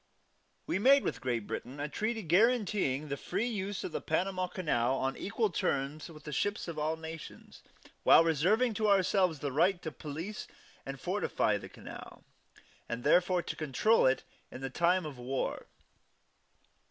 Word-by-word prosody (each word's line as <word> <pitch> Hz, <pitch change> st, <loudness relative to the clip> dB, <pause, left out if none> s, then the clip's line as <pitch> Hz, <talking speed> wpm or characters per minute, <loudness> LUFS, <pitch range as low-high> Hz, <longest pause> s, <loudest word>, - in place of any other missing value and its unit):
We -, -, -1 dB
made 275 Hz, +6 st, +6 dB
with -, -, -3 dB
Great 120 Hz, -4 st, -1 dB
Britain 130 Hz, +7 st, -6 dB
a 145 Hz, -, -2 dB
treaty 220 Hz, +7 st, -2 dB
guaranteeing 190 Hz, -, +2 dB
the 140 Hz, -, -2 dB
free 220 Hz, -, -2 dB
use 205 Hz, -4 st, -3 dB
of -, -, -4 dB
the -, -, -3 dB
Panama 185 Hz, +3 st, 0 dB
Canal 135 Hz, -9 st, 0 dB
on 135 Hz, 0 st, -1 dB
equal 220 Hz, +1 st, -1 dB
terms 140 Hz, 0 st, -1 dB
to 165 Hz, -3 st, -11 dB
the 150 Hz, 0 st, -9 dB
ships 205 Hz, +9 st, -1 dB
of 165 Hz, -2 st, -5 dB
all 155 Hz, +1 st, 0 dB
nations, 160 Hz, 0 st, -9 dB, 0.4 s
while -, -, +7 dB
reserving 185 Hz, -, +2 dB
to 215 Hz, 0 st, 0 dB
ourselves 185 Hz, -5 st, +3 dB
the 145 Hz, -, -2 dB
right 175 Hz, +7 st, +3 dB
to 160 Hz, -, -4 dB
police 160 Hz, -, -6 dB, 0.4 s
and 135 Hz, 0 st, -5 dB
fortify -, -, 0 dB
the -, -, -10 dB
canal, -, -, -11 dB, 0.7 s
and 120 Hz, +1 st, -4 dB
therefore 175 Hz, +3 st, +3 dB
to -, -, -5 dB
control 155 Hz, -, +3 dB
it 130 Hz, -, +1 dB, 0.3 s
in 135 Hz, +1 st, -5 dB
time 175 Hz, +3 st, +2 dB
of 140 Hz, -5 st, -7 dB
war. 130 Hz, +2 st, -3 dB
165 Hz, 160 wpm, -31 LUFS, 140-195 Hz, 0.7 s, while